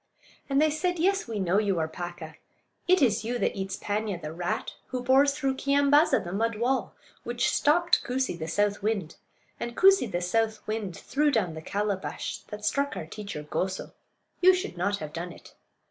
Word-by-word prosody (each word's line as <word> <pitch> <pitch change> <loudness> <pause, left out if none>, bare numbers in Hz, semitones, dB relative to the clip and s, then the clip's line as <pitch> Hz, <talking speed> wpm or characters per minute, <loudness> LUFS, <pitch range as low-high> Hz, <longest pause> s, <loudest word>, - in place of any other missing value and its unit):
And 275 0 +3
they 310 0 +4
said: 355 +4 -1
"Yes, 390 +2 +1
we 225 -3 -3
know 190 +1 +2
you 200 -4 +1
are 160 -1 0
Paaka; 175 -1 -7 0.5
it 365 -3 +5
is 220 -3 +2
you 240 +2 -2
that - - 0
eats 190 -1 -3
Paanya, 205 -3 -2
the 155 -2 -6
rat; 175 +1 -3
who 255 -1 -4
bores 275 +3 +4
through 270 -1 -1
Keeyambaaza, 285 +3 +4
the 175 0 -6
mud 225 +3 0
wall; 240 -2 0 0.3
which 240 0 0
stopped 340 +4 +3
Koosee, 255 -1 -1
the 160 -1 -5
south 205 +5 0
wind; 200 -6 -2 0.4
and 235 0 -5
Koosee, 385 - +5
the 175 - 0
south 220 +4 0
wind, 215 -5 -3
threw 295 +2 +1
down 215 - +1
the 160 - -7
calabash 200 +2 -3
that 210 0 -7
struck 280 +5 0
our - - -4
teacher 200 -3 -7
Goso. 185 +5 -3 0.5
You 370 +1 +7
should 365 - -4
not 200 +3 0
have 155 -3 -7
done 175 +2 -5
it." - - -14
215 Hz, 190 wpm, -27 LUFS, 185-275 Hz, 0.5 s, You